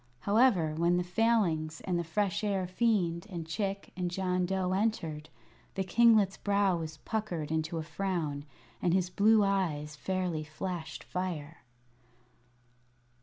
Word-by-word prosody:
However, 200 - +3
when 170 +2 +2
the 180 - +1
Failings 180 -6 +1
and 180 -2 -1
the - - -1
Fresh 195 +4 -1
Air 195 -3 0
Fiend 185 -3 0
and 170 -4 -5
Chick 195 +3 -3
and 180 -1 -1
John 180 0 0
Dough 190 -1 0
entered, 185 -7 -1 0.5
the 195 - 0
kinglet's 215 -1 +4
brow 200 -2 +2
was 160 -1 -6
puckered 175 -6 -3
into 160 +1 -1
a 160 - -2
frown, 160 -4 -2 0.4
and 175 0 +2
his 185 -1 0
blue 215 +3 +5
eyes 165 -7 0
fairly 180 -1 -2
flashed 160 +1 -5
fire. 165 -4 -4
180 Hz, 135 wpm, -31 LUFS, 160-200 Hz, 0.5 s, blue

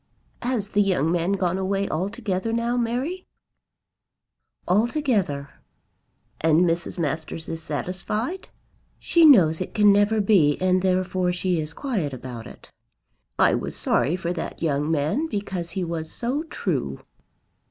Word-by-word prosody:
"Has 240 -5 -1
the 205 - +2
young 180 -6 +1
man 175 +2 +1
gone 185 -1 0
away 195 +1 0
altogether 200 +4 -2
now, 235 +1 0
Mary?" 250 +10 -2 1.4
"Altogether." 205 - +1 0.9
"And 160 +1 +4
Mrs. 170 0 0
Masters 160 0 -3
is 165 0 -5
satisfied?" 190 - -3 0.5
"She 335 -1 +4
knows 175 - +6
it 185 - -5
can 210 -1 +6
never 205 +2 +3
be, 190 -8 +4
and 185 0 +2
therefore 185 -1 +1
she 180 -1 0
is 155 0 -4
quiet 205 - -2
about 125 -2 -7
it." - - -14 0.7
"I - - +4
was - - -3
sorry 160 - +1
for 175 -1 -3
that 165 -1 -6
young 150 -1 0
man, 160 - 0
because 195 - -4
he 185 +2 -3
was 165 -2 -4
so 250 +5 -2
true." - - -3
185 Hz, 135 wpm, -24 LUFS, 165-220 Hz, 1.4 s, knows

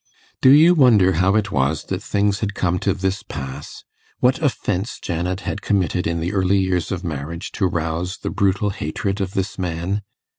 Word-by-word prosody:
Do 130 - +6
you 155 +6 +7
wonder 115 - +5
how 95 +4 +2
it 110 -1 +1
was 70 +3 0
that - - -4
things 100 0 0
had 100 -2 -3
come 90 -1 0
to - - +1
this 95 +1 -2
pass 65 -1 -8 0.4
what 130 +5 +2
offence 115 - -1
Janet 90 +2 -3
had 100 - -4
committed 90 -3 0
in 85 0 -1
the 85 +5 -2
early 95 0 +2
years 95 -4 0
of 95 -1 -3
marriage 85 +3 -5
to 95 - 0
rouse 85 +2 -2
the - - -5
brutal 100 +1 +1
hatred 95 +5 -3
of 95 -1 -3
this 95 0 -2
man? 90 +3 -2
95 Hz, 185 wpm, -21 LUFS, 85-100 Hz, 0.4 s, you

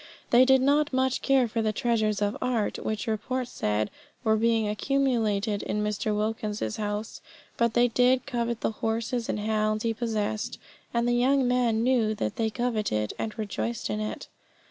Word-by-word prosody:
They 245 +2 +7
did 265 0 +5
not 290 +2 +3
much 260 0 +1
care 270 -3 +3
for 225 +1 -2
the 215 -1 +1
treasures 215 -2 0
of 205 +1 0
art, 245 -4 0
which 215 -1 -2
report 240 +3 -2
said 105 - -1 0.3
were 220 -2 +3
being 225 0 +2
accumulated 215 -3 0
in 210 0 -2
Mr. 210 0 -1
Wilkins's 210 - -2
house. 210 0 -4 0.3
But 235 -1 +1
they 240 0 +5
did 250 +2 +3
covet 235 -3 -2
the - - 0
horses 225 +2 -2
and - - -1
hounds 215 0 0
he 230 -1 +1
possessed, 215 -2 -2 0.3
and 235 0 +1
the 240 - +2
young 260 +2 +3
man 240 -3 +2
knew 235 -4 +2
that 110 - -3
they 225 -1 +1
coveted, 215 - -1
and 220 - -4
rejoiced 120 - -3
in 105 - -2
it. 105 0 -4
225 Hz, 170 wpm, -27 LUFS, 210-245 Hz, 0.3 s, They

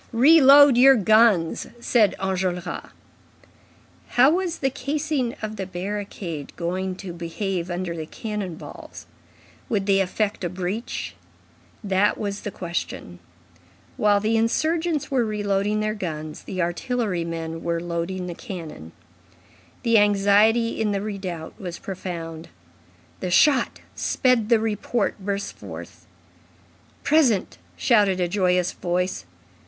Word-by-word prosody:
"Reload 280 0 +7
your 270 +2 +8
guns," 215 -5 +3
said 230 -4 +3
Enjolras. 185 -2 -2 1.2
How 260 +4 +5
was 350 -1 -1
the 270 -1 0
casing 280 -1 -2
of 215 0 -4
the 190 -1 -4
barricade 185 -5 -5
going 185 +2 -2
to 185 -2 -8
behave 175 +1 -3
under 175 -1 -3
the 160 -1 -6
cannon 210 -5 -5
balls? - - -11 0.6
Would 205 -4 0
they 195 -1 +3
effect 200 +2 -1
a 175 - -1
breach? 185 +6 -4 0.7
That 195 0 +2
was 200 -1 -4
the - - -4
question. 170 - -5 0.8
While 205 -1 +3
the 220 +2 +1
insurgents 315 +7 0
were 260 -3 +2
reloading 210 -1 0
their 215 0 0
guns, 155 -6 -6
the 185 -2 -2
artillery 185 +1 -1
men 165 -1 -5
were 170 0 -1
loading 175 +2 -3
the 175 - -5
cannon. 165 - -8 0.9
The 230 -2 +5
anxiety 205 +3 +3
in 210 -2 +1
the 195 - -1
redoubt 190 -6 -6
was 175 -3 -5
profound. 170 -4 -6 0.7
The 185 - -3
shot 260 - +3
sped 250 -4 +1
the 230 -2 +5
report 220 0 -1
burst 200 +1 -3
forth. - - -10 1.0
"Present!" 275 -10 +2 0.2
shouted 205 -6 +3
a 180 - +1
joyous 180 -1 +1
voice. 180 - -2
200 Hz, 125 wpm, -24 LUFS, 180-230 Hz, 1.2 s, your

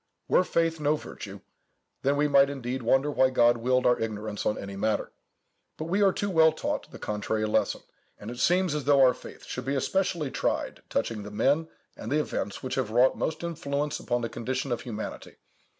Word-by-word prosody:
Were - - +4
faith 165 -2 0
no 150 0 +2
virtue, - - -9 0.6
then 140 +1 +1
we 150 +1 +3
might 140 -1 +5
indeed 130 -2 -4
wonder 135 +5 +2
why 130 -2 +4
God 120 -2 +4
willed 125 +2 +1
our 125 - +4
ignorance 105 -1 -3
on 105 - 0
any 100 0 -6
matter. 105 +1 -1 0.7
But 155 - -4
we 195 +4 +1
are 195 -1 +5
too 205 +1 -2
well 160 -2 +6
taught - - -3
the - - -10
contrary 105 +1 -2
lesson; 105 - 0 0.4
and 105 +3 -7
it 120 - -8
seems 180 0 +3
as 150 -3 -3
though 140 -1 +5
our 130 -1 +6
faith - - -12
should 125 - -5
be 135 +1 0
especially 170 0 0
tried - - -2
touching 110 -2 -1
the 105 - -7
men 145 +9 +1 0.3
and 110 - -7
the 150 - +3
events 105 -8 -3
which 130 - -3
have 115 - -5
wrought 125 +4 +4
most 160 +1 -3
influence 150 -3 -2
upon 120 -1 -1
the 115 - -1
condition 130 +2 -3
of 120 - -1
humanity. 110 -3 -6
130 Hz, 200 wpm, -27 LUFS, 115-150 Hz, 0.7 s, well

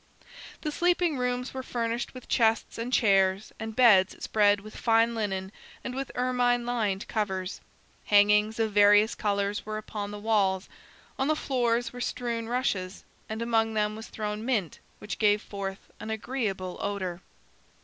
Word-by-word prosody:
The 305 - -2
sleeping 345 -3 +1
rooms 250 0 -2
were 260 - -4
furnished 235 -1 -3
with 255 - -10
chests, 225 -1 +1
and 235 +2 -3
chairs, 195 -3 +2
and 220 0 -5
beds 210 -6 +5
spread 205 -1 +3
with 215 +1 -12
fine 230 0 +3
linen 195 -4 -3 0.3
and 250 - -4
with 270 +1 -4
ermine 245 -1 +1
lined 215 -5 -1
covers. 190 -3 -3 0.4
Hangings 210 +2 +4
of 220 -1 +1
various 205 +1 +6
colors 200 -1 -1
were 215 0 -4
upon 210 -1 -5
the 205 - -6
walls. 205 -3 +1 0.5
On 270 - +1
the 310 - +2
floors 240 -5 0
were 245 - -7
strewn 235 -2 -3
rushes, 200 -7 -2 0.3
and 220 +1 -3
among 225 -1 +1
them 210 0 0
was 220 +1 -8
thrown 210 0 -4
mint 220 - -1 0.2
which 210 - -6
gave 210 -1 +4
forth 195 -1 -7
an 220 - -7
agreeable 220 -5 -3
odor. 190 -3 -3
220 Hz, 155 wpm, -28 LUFS, 205-240 Hz, 0.5 s, various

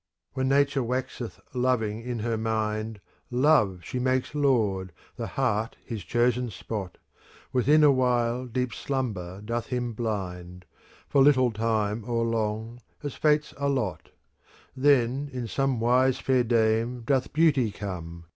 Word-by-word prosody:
When 130 0 0
Nature 140 0 +3
waxeth 125 -1 -4
loving 120 -4 0
in 120 0 -4
her 115 +1 -1
mind, 110 -1 -2 0.2
* - - -43 0.2
Love 105 - +4
she 125 - -4
makes 130 +1 0
Lord, 110 - +1 0.2
the - - -4
heart 115 -4 -1
his 110 -6 -5
chosen 120 +2 +1
spot. 100 -3 -6 0.6
Within 145 +5 +4
awhile 125 -3 +2
deep 125 0 -2
slumber 100 -10 -3
doth 115 +1 -2
him 125 -2 -2
blind. 90 -5 -4 0.4
For 140 - +3
little 130 -3 +5
time 110 -1 -1
or 115 -1 +1
long, 115 +1 -2 0.2
as 145 -3 -3
fates 150 0 +1
allot: 130 - -1 0.7
Then 135 0 +2
in 125 -2 -4
some 135 +1 0
wise 125 +3 +3
fair 130 -2 +2
dame 115 +1 +1
doth 130 +2 0
beauty 145 -7 +3
come. 85 -5 -7
120 Hz, 135 wpm, -27 LUFS, 110-130 Hz, 0.7 s, little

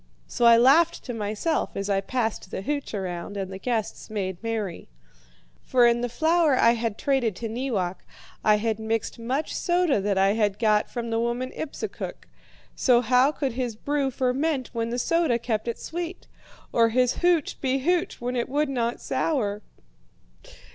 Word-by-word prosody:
"So 240 - -1
I 235 0 +8
laughed 290 +8 +4
to 245 - -5
myself 220 +9 -2
as 195 0 -3
I 195 -1 +1
passed 225 -3 -2
the 190 - -5
hooch 285 -2 -3
around 185 0 -4
and 195 -1 -4
the 190 - -7
guests 225 -1 -3
made 190 -4 -3
merry. 220 - -4 0.7
For 250 -2 +3
in 235 0 +3
the 245 - -1
flour 315 +2 +3
I 230 - +5
had 230 -2 -2
traded 260 -7 0
to 230 - -4
Neewak 220 -6 -2 0.4
I 215 - +5
had 220 +1 -1
mixed 225 +1 -2
much 260 +6 -2
soda 345 - +2
that 200 0 0
I 195 +1 +4
had 205 -2 +1
got 215 -2 +2
from 235 -2 -4
the 225 - +1
woman 240 +2 -1
Ipsukuk. 315 - -6 0.5
So 245 -2 +4
how 250 +4 +4
could 280 -3 -2
his 245 -2 -3
brew 285 +4 -1
ferment 265 +2 -1
when 230 0 -2
the 240 - -2
soda 325 -1 +2
kept 225 -2 -2
it 235 - -2
sweet? 345 +2 -6 0.5
Or 230 -1 +4
his 250 +1 +2
hooch 345 -4 +1
be 265 0 +1
hooch 340 +6 0
when 245 +1 -3
it 240 0 -1
would 295 +2 0
not 240 -3 -1
sour? 210 -10 -1
235 Hz, 175 wpm, -25 LUFS, 215-270 Hz, 0.7 s, I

